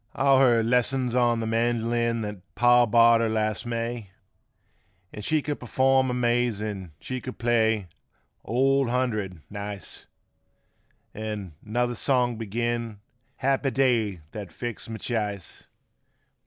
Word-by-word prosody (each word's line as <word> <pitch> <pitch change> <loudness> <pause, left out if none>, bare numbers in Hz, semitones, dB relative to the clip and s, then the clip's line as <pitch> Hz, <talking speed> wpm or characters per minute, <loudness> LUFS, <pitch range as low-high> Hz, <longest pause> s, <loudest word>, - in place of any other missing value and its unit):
55 135 - -1
All 135 -1 +6
her 120 -4 +4
lessons 125 +1 +1
on 120 -2 +2
th' 110 - -2
melojun 115 0 0
that 105 -3 -8
paw 120 +1 +5
bought 115 +1 +6
fur 115 - +1
her - - 0
last 110 +2 -1
May, 115 -2 -3 1.0
An' 105 - -7
she 155 +7 0
could 145 -1 -3
perform 130 +1 +2
amazin'; 120 -6 -1
she 130 -1 -5
could 130 - -7
play 115 -3 +2 0.3
" - - -44
Old 135 +2 +2
Hundred 110 -9 -2
" - - -43
nice 100 -1 -6 1.1
An' 105 -5 -5
another 120 +3 -1
song 125 0 +1
beginin' 115 0 -2 0.4
''Happy 135 0 +1
Day 115 -9 +1
that 105 -4 -7
Fixed 120 -2 -6
My 110 - -5
Ch'ice." 105 -6 -4
115 Hz, 135 wpm, -26 LUFS, 110-125 Hz, 1.1 s, All